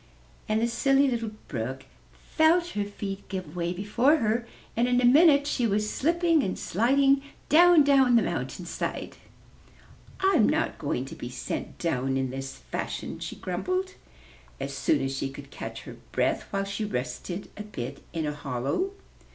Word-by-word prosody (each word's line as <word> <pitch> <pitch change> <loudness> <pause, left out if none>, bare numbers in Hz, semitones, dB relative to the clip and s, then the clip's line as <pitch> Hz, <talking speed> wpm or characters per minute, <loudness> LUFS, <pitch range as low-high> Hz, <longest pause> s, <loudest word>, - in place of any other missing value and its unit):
And 215 0 +2
the 230 - +2
Silly 275 +3 +3
Little 235 -3 -1 0.2
Brook 130 +1 -4 0.5
felt 335 +2 +4
her 205 -8 -2
feet 200 -1 -6
give 185 -2 -5
way 170 0 -1
before 210 - +2
her, 235 -3 0 0.3
and 235 +2 +2
in 250 0 +3
a 250 - +3
minute 285 +2 +6
she 250 -4 +1
was 210 0 0
slipping 335 +1 +2
and 185 - -2
sliding 270 +7 +3 0.3
down, 340 0 +7
down 270 -3 +5
the 230 - +5
mountain - - -3
side. - - -4 1.0
'Tm 385 0 +4
not - - 0
going - - -2
to - - -9
be - - -7
sent - - -5
down 135 -5 0
in 130 -1 -1
this 135 0 -5
fashion," - - -5
she - - -5
grumbled, 370 +1 -2 0.7
as 135 0 -4
soon 140 +1 +1
as 135 0 -2
she 135 0 -2
could 140 +1 -11
catch - - -7
her - - -10
breath, - - 0
while 195 0 0
she 200 +2 -3
rested 175 +2 -4
a - - -7
bit 140 - -7
in 165 -2 -2
a 150 - -2
hollow. 140 - -2
210 Hz, 165 wpm, -27 LUFS, -, 1.0 s, down